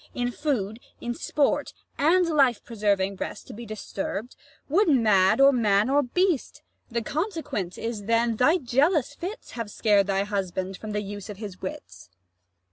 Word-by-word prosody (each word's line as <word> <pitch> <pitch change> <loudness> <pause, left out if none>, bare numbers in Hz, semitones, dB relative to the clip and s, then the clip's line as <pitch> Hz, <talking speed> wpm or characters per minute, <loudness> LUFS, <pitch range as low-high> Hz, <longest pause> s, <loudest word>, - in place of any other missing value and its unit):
In 245 0 -1
food, 230 -7 -2 0.2
in 240 - -3
sport, 285 +4 0 0.2
and 350 +5 +4
life 275 -8 +3
preserving 200 -4 0
rest - - -5
To - - -10
be 235 +2 -9
disturb'd, 215 +2 -5 0.3
would 350 +6 +3
mad 215 -7 +4
or 275 +1 +8
man 215 -1 +3
or 290 +1 +4
beast: 340 +3 0 0.3
The 235 -1 -2
consequence 300 - -3
is, 225 -3 -4
then, 230 0 +2
thy 310 +9 +4
jealous 290 +1 +1
fits 375 +10 -7
85 - - -11
Have 230 -3 -4
scared 205 -2 +2
thy 195 0 +1
husband 190 -2 -3
from 215 -1 -6
the 210 0 -1
use 205 +1 -7
of 205 - -7 0.2
wits. 90 - -8
_Luc. - - -39
230 Hz, 165 wpm, -26 LUFS, 200-285 Hz, 0.3 s, or